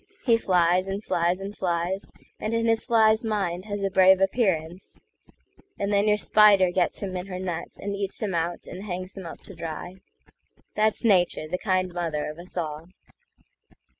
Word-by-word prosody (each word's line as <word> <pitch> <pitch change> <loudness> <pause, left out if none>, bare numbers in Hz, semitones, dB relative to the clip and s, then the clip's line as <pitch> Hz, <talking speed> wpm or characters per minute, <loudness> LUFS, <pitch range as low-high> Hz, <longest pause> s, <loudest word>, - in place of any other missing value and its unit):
He 235 -3 +5
flies, 180 -3 +2
and 195 +2 -4
flies, 175 0 0
and 200 +1 -6
flies, 175 +1 -2 0.3
And 220 +2 -2
in 230 0 +1
his 225 -1 +2
fly's 220 -1 +3
mind 195 -5 -2
has 205 -1 -4
a 195 - 0
brave 190 0 +6
appearance; 190 -4 -1 0.8
And 200 +1 -1
then 200 +1 +3
your 210 0 +4
spider 205 -3 +5
gets 180 -1 0
him 190 -2 -4
in 180 +1 -4
her 185 -2 -5
net, 175 -2 -5
And 200 0 -4
eats 200 -1 -4
him 205 -4 -2
out, 170 +1 -2
and 190 +3 -8
hangs 185 -1 -5
him 190 -3 -7
up - - -10
to 195 - -11
dry. 170 +2 -7 0.8
That's 215 +2 +1
Nature, 180 -6 +3
the 180 +3 -3
kind 185 -3 0
mother 165 -4 -2
of 155 - -13
us 180 +1 -11
all. 155 -1 -4
185 Hz, 180 wpm, -25 LUFS, 175-205 Hz, 0.8 s, brave